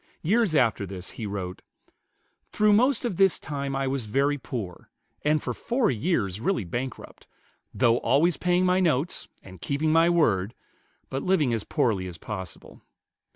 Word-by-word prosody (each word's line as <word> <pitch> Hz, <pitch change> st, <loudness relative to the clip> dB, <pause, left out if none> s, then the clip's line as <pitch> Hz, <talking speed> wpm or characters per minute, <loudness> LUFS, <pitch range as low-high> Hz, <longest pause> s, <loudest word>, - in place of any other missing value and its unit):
Years 200 Hz, 0 st, +2 dB
after 115 Hz, -7 st, +2 dB
this 90 Hz, -1 st, -6 dB
he 110 Hz, -, -6 dB
wrote, 95 Hz, -3 st, -5 dB, 0.9 s
"Through 210 Hz, 0 st, +3 dB
most 250 Hz, +5 st, +3 dB
of 205 Hz, -8 st, -2 dB
this 195 Hz, -2 st, +4 dB
time 140 Hz, -2 st, -4 dB
I 135 Hz, 0 st, -1 dB
was 130 Hz, -4 st, -2 dB
very 140 Hz, +6 st, +1 dB
poor, 105 Hz, -10 st, -6 dB, 0.3 s
and 150 Hz, 0 st, +2 dB
for 125 Hz, -, -2 dB
four 240 Hz, -, 0 dB
years 110 Hz, -, -1 dB
really 155 Hz, -, 0 dB
bankrupt, 120 Hz, +9 st, -6 dB, 0.4 s
though 120 Hz, -2 st, +3 dB
always 145 Hz, +8 st, +2 dB
paying 180 Hz, +4 st, +1 dB
my 180 Hz, 0 st, +3 dB
notes, 160 Hz, -2 st, 0 dB, 0.2 s
and 95 Hz, -3 st, -13 dB
keeping 150 Hz, +2 st, 0 dB
my 165 Hz, +1 st, +5 dB
word, 110 Hz, -, +2 dB, 0.6 s
but 135 Hz, -, -2 dB
living 155 Hz, -9 st, +2 dB
as 110 Hz, -3 st, -1 dB
poorly 110 Hz, -12 st, 0 dB
as 90 Hz, -2 st, -8 dB
possible. 95 Hz, -2 st, -8 dB
135 Hz, 155 wpm, -26 LUFS, 105-175 Hz, 0.9 s, my